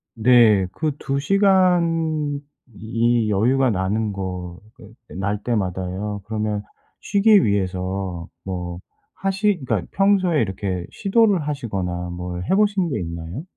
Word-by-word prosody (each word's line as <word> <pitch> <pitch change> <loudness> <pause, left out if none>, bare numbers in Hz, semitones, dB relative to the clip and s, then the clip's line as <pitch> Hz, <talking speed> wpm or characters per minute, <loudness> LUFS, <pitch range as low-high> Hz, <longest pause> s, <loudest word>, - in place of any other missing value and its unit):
네. 110 -4 +5
그 155 -1 -1
2 135 0 -2
시간이 165 -5 +2 0.9
여유가 125 +6 +2
나는 105 +2 -1
거 90 -2 -5 0.2
그 110 -4 -15
그 - - -13
날 100 +2 -2
때마다요 100 -1 -2
그러면 105 -1 -2 0.4
쉬기 205 0 +4
위해서 95 -3 -2 0.2
뭐 90 -2 -5 0.3
하시 195 0 0
그러니까 110 -7 -1
평소에 190 -5 +3
이렇게 95 -3 -3
시도를 200 -6 +2
하시거나 95 -11 -3
뭘 90 0 -5
해 190 - +4
보신 200 -4 +2
게 120 - -2
있나요? 85 - -6
110 Hz, 240 characters per minute, -22 LUFS, -, 0.9 s, 네